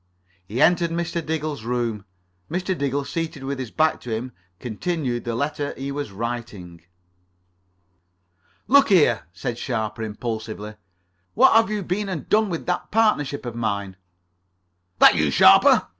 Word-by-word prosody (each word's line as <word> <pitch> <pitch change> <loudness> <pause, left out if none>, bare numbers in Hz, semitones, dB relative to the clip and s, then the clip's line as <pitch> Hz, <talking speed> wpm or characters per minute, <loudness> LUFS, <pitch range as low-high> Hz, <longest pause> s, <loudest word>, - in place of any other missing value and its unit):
He 110 +6 -4
entered 170 0 +3
Mr. 170 0 -3
Diggle's 155 -5 -3
room. 115 -4 -2 0.4
Mr. 185 +2 -2
Diggle, 140 -1 -2
seated 160 -3 -4
with 135 0 -4
his 130 -3 -5
back 155 +5 +1
to 125 - -9
him, 115 +3 -3 0.3
continued 125 +1 -3
the 120 -1 -2
letter 145 +2 -2
he 135 +1 -4
was 145 -6 -4
writing. 105 -6 -6 1.9
"Look 280 -1 +5
here," 145 - +4
said 115 +7 -5
Sharper 110 -3 -3
impulsively, 110 -1 -5 0.6
"what 260 +4 +6
have 225 0 +4
you 210 -2 -2
been 195 +3 -2
and 175 -6 -5
done 215 -1 +2
with 165 -3 -4
that 180 - -2
partnership 205 - +1
of 120 - -4
mine?" 100 -4 -3 1.0
"That - - +8
you, 75 -3 +1
Sharper? 70 - +6
135 Hz, 145 wpm, -23 LUFS, 115-170 Hz, 1.9 s, That